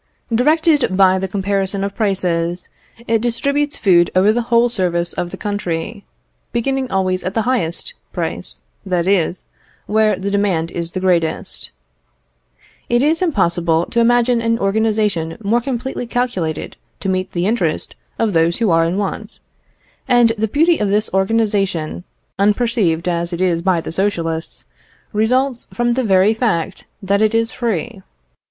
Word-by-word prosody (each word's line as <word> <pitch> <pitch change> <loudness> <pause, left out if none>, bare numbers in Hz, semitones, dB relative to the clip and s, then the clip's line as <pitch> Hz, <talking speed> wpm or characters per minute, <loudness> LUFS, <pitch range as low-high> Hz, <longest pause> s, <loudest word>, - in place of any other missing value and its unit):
Directed 295 - +2
by 190 -1 +5
the 190 - -2
comparison 195 0 -1
of 200 0 -3
prices, 180 -5 -1 0.4
it 225 -1 +2
distributes 280 +5 -1
food 175 -4 +4
over 195 +4 +4
the 240 - 0
whole 235 0 +3
surface 175 -6 -1
of 175 - -3
the 190 - -8
country, 205 0 -4 0.5
beginning 265 +2 -1
always 185 -1 0
at 185 +2 -4
the 225 - +1
highest, 240 - -1 0.2
price, - - -4 0.2
that 180 -3 -1
is, 185 -2 +1 0.4
where 215 -1 +2
the 195 +2 -3
demand 190 -5 0
is 170 0 -4
the 185 - -2
greatest. 175 -4 -1 1.2
It 240 +2 +3
is 320 +4 +2
impossible 175 - +1
to 235 - +1
imagine 240 0 +3
an 230 0 +1
organisation 205 -5 0
more 230 +4 +2
completely 250 -1 -4
calculated 225 -11 -2 0.2
to - - -4
meet 185 0 -1
the 175 0 -1
interest 190 -8 -1 0.2
of 225 -3 0
those 165 +1 +2
who 225 -6 +1
are 165 0 +4
in 170 +3 -1
want; 205 +2 -4 0.7
and 245 -2 +5
the 220 0 -1
beauty 320 +8 +2
of 210 - 0
this 210 +2 +1
organisation, 195 -5 0 0.3
unperceived 205 -5 +1
as 170 0 -1
it 170 - -3
is 175 -3 +1
by 180 -1 +2
the - - -6
Socialists, 165 -3 -2 0.5
results 250 +4 +1
from 240 0 0
the 260 +1 0
very 195 0 +4
fact 200 -6 -2 0.2
that 200 +2 +1
it 220 +1 +2
is 230 +1 +1
free. 230 -2 -3
200 Hz, 150 wpm, -18 LUFS, 180-235 Hz, 1.2 s, by